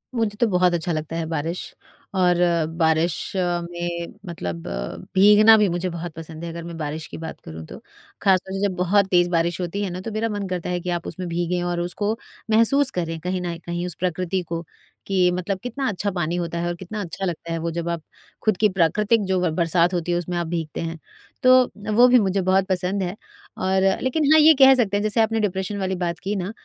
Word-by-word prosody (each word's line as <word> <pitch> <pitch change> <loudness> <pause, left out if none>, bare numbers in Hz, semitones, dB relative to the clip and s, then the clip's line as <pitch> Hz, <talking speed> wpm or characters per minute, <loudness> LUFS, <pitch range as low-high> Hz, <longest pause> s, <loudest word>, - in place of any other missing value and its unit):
मुझे 225 -3 0
तो 235 - +5
बहुत 180 -3 +3
अच्छा 175 0 -1
लगता 155 0 -3
है 165 -1 -2
बारिश। 165 +2 -4 0.4
और 180 -1 +4 0.4
बारिश 160 0 +2 0.2
में 175 -1 -2
मतलब 90 - -5 0.6
भीगना 210 +3 +7
भी 210 -1 +4
मुझे 175 +1 -2
बहुत 170 0 -6
पसंद 165 0 -9
है 170 - -4
अगर 170 0 -7
मैं 170 0 -7
बारिश 155 0 -4
की - - -9
बात 160 0 -7
करूँ 80 0 -8
तो। - - -10 0.4
ख़ासतौर 190 -1 +2
से 195 - -3
जब 185 - -5
बहुत 185 +3 +3
तेज 175 -1 +4
बारिश 170 0 0
होती 180 +3 -3
है 195 - -2
ना, 180 +1 -5
तो 225 - -6
मेरा 220 +2 -1
मन 205 -2 -3
करता 180 -1 -3
है 180 0 -1
कि 180 - -5
आप 175 -1 -2
उसमें 185 -1 -5
भीगें 175 +1 -1
और 175 0 -1
उसको 205 +5 -2 0.3
महसूस 240 +6 +4
करें 165 -2 -3
कहीं 180 +2 -3
न 170 -1 -3
कहीं 175 0 -3
उस 180 - -4
प्रकृति 185 +1 -1
को, 170 0 -5 0.4
कि 185 -2 +3
मतलब 185 +2 -2
कितना 260 +2 -3
अच्छा 200 0 -2
पानी 175 -2 -2
होता 170 -1 -3
है 170 - -1
और 175 - -2
कितना 190 +4 -6
अच्छा 190 +1 -5
लगता 170 -1 -4
है 165 - -1
वो 170 +1 -2
जब 170 +1 -3
आप 170 -1 -2 0.4
खुद 215 -4 +2
की 215 +2 +3
प्राकृतिक 200 +5 +2
जो 190 -1 +1
ब 180 - +2
बरसात 170 +1 +2
होती 175 0 -1
है, 175 - +2
उसमें 175 0 -3
आप 170 - -2
भीगते 160 -2 -4
हैं। 165 0 -4 0.5
तो, 255 0 +6 0.2
वो 245 +3 +7
भी 250 0 +6
मुझे 195 -2 +1
बहुत 190 +1 +2
पसंद 190 +1 0
है 180 +2 -3 0.4
और 190 0 +1 0.2
लेकिन 280 +3 +1
हाँ, 315 - +8
ये 315 +1 +8
कह 270 0 +9
सकते 210 -5 +1
हैं - - -1
जैसे 215 +1 +2
आपने 225 0 +1
डिप्रेशन 195 -1 -2
वाली 190 -1 -1
बात 175 -2 -3
की 200 +2 -1
ना, 190 0 -3
180 Hz, 225 wpm, -23 LUFS, 170-200 Hz, 0.6 s, कह